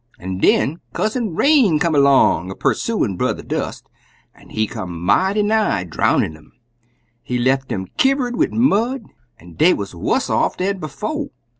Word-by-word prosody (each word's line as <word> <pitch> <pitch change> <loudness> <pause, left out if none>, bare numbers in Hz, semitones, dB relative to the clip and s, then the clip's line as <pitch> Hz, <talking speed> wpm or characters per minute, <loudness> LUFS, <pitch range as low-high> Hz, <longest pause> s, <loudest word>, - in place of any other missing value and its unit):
"An' 95 +1 -5
den 155 - +2
Cousin 215 -5 -2
Rain 265 - +4
come 165 +1 0
'long, 140 - +4
a 95 - -6
pursuin' 130 - -1
Brer - - 0
Dust, - - -5 0.5
an' - - -19
he 110 - -1
come 90 -4 -6
mighty 190 - +2
nigh 215 - +1
drownin' 80 -2 0
um. 80 -1 -20 0.7
He 125 - -3
left 130 +1 0
um 95 -1 -3
kivver'd 265 -2 +2
wid - - +1
mud, 235 +1 +1 0.3
an' 85 +1 -15
dey 165 - +4
wuz 100 -2 -6
wuss 85 - -1
off - - 0
dan 195 +1 -1
befo'. 215 - -4
160 Hz, 155 wpm, -19 LUFS, -, 0.7 s, Rain